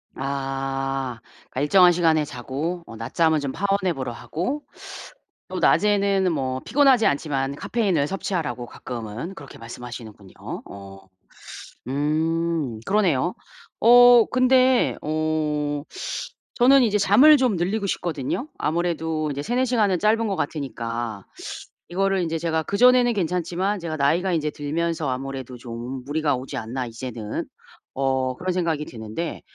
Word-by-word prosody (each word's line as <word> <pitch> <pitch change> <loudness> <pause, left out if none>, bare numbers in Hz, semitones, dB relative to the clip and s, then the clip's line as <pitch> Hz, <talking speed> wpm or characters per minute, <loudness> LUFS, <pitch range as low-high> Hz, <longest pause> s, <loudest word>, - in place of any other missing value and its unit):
아. 135 -2 -3 0.3
그니까 130 - -5
일정한 180 +4 +6
시간에 165 -3 +2
자고 145 +7 -4
어 115 - -10
낮잠은 160 +8 +1
좀 140 -2 -3
파워냅으로 185 -9 -1
하고 215 - -4 0.9
또 - - -4
낮에는 200 -3 +3
뭐 130 -3 -2
피곤하지 265 -4 +4
않지만 140 -1 -1
카페인을 185 -8 0
섭취하라고 170 -9 -3
가끔은 120 - -6
그렇게 140 -5 -11
말씀하시는군요. 115 -4 -9 0.3
어. 95 -1 -11 0.9
음 155 -2 -1
그러네요. 180 -6 +2 0.5
어 245 0 +8
근데 255 0 +4
어 150 -2 -1 0.7
저는 265 +2 +6
이제 210 -3 +2
잠을 250 +11 +7
좀 250 -7 +2
늘리고 200 +4 -1
싶거든요. 175 - -3
아무래도 160 -2 -1
이제 140 +1 -3
3~4 245 +6 0
시간은 210 -7 +2
짧은 225 +2 +2
것 195 - -1
같으니까 115 - -4 0.7
이거를 195 +1 +1
인제 165 0 -2
제가 160 -1 0
'그전에는 245 +5 +4
괜찮지만 180 +1 -1
제가 160 -3 -4
나이가 170 +7 +2
인제 155 -2 0
들면서 160 +1 -2
아무래도 130 -1 -5
좀 120 +2 -7
무리가 145 -1 0
오지 130 +1 -7
않나 125 +3 -4
이제는.' 115 -2 -5 0.5
어 130 -1 0
그런 185 0 -2
생각이 165 -4 -1
드는데 110 +8 -6
155 Hz, 300 characters per minute, -23 LUFS, 135-195 Hz, 0.9 s, 어